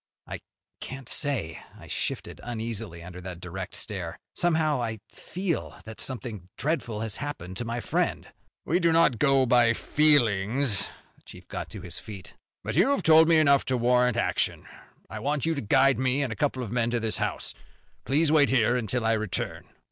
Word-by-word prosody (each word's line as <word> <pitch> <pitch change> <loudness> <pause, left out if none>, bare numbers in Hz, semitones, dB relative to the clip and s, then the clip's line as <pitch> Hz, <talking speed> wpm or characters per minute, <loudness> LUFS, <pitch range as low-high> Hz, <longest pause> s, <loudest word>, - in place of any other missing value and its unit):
"I - - -6 0.4
can't 130 -1 -8
say." 130 - -1 0.2
I - - -13
shifted - - -4
uneasily 110 -7 -5
under 90 +1 -9
that 90 -1 -7
direct 90 +1 -6
stare. 95 -6 -4 0.2
"Somehow 160 -5 +1
I 115 -2 -3
feel 185 -2 -4
that 110 0 -6
something 115 -8 -4
dreadful 135 -8 -2
has 110 -2 -3
happened 115 -11 -6
to 120 - -3
my 115 +1 -3
friend." - - -1 0.4
"We 170 +4 +1
do 170 -2 +3
not 160 -8 +3
go 135 -2 +4
by 120 -2 +4
feelings." 120 -6 +3 0.3
The - - -27
chief - - -14
got - - -6
to 105 - -8
his 90 -1 -7
feet. 100 -5 -9 0.3
"But - - -4
you - - +5
have 280 - +1
told 160 0 +7
me 165 -1 +5
enough 140 -3 +4
to 130 - 0
warrant 125 +1 +2
action. - - 0 0.4
I - - -7
want 145 0 -1
you 165 - +1
to 140 - -3
guide 135 +5 +3
me 130 +2 +1
and 125 -5 -2
a - - -10
couple 135 -2 -1
of 110 - -6
men 120 -1 +1
to 120 0 0
this 110 -1 -1
house. - - -3 0.5
Please 150 +6 +2
wait 150 -3 +5
here 120 -2 +3
until 120 0 -1
I 115 - +3
return." 110 -3 -3
125 Hz, 185 wpm, -27 LUFS, 110-145 Hz, 0.5 s, told